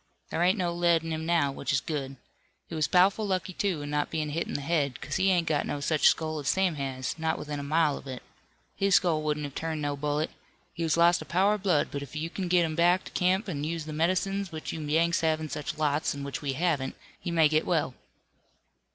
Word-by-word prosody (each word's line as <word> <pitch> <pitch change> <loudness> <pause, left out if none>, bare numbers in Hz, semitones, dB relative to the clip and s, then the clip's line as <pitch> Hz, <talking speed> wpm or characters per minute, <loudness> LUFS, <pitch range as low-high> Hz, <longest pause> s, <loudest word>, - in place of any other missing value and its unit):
There - - -1
ain't 185 +4 +4
no 175 -3 0
lead 170 -1 +3
in 165 - -4
him 160 +1 -3
now, 165 -5 +2
which 135 -1 -3
is 135 - +3
good. 135 -3 -4 0.5
He - - -10
was 155 -2 +1
pow'ful 190 +5 +4
lucky, 185 -1 -1
too, 175 -6 -1
in 145 - -5
not 150 0 0
bein' 155 -2 -2
hit 165 +3 -2
in - - -5
the 145 - -2
head, 140 -4 0
'cause 140 +2 -3
he 195 0 +3
ain't 175 -3 +3
got 155 -3 0
no 145 - -2
such 150 +1 +3
skull 155 -1 +1
as 140 - -6
Sam 190 -2 +2
has, 135 0 -4
not 160 0 0
within 150 -1 -5
a - - -5
mile 150 0 +2
of - - -13
it. 130 -1 -6 0.5
His 195 -1 +3
skull 165 -4 +3
wouldn't 150 -1 -1
have 145 -2 -5
turned 160 0 -3
no 145 0 -1
bullet. 150 +2 -1 0.4
He 170 - -7
has 165 0 +1
lost 170 +1 +5
a - - -7
power 190 +4 +3
of 210 - -3
blood, 180 -7 +2
but 140 - -4
if 140 +1 -9
you 160 +2 -3
kin 190 -2 -3
get 175 -1 +4
him 160 -1 -3
back 175 +3 +3
to - - -10
camp, 190 +3 +1
an' 145 -6 -3
use 160 0 -3
the 155 - -6
med'cines 185 +4 0
which 155 -1 -5
you 160 - -5
Yanks 165 +3 +2
have 160 -1 +2
in 155 -1 -5
such 150 -1 -4
lots 150 -1 0
an' 140 - -6
which 140 0 -5
we 140 -2 -2
haven't, 145 -3 0 0.2
he 175 - -5
may 165 -2 +4
get 155 +1 +1
well." 160 -7 +1
160 Hz, 255 wpm, -28 LUFS, 145-175 Hz, 0.5 s, lost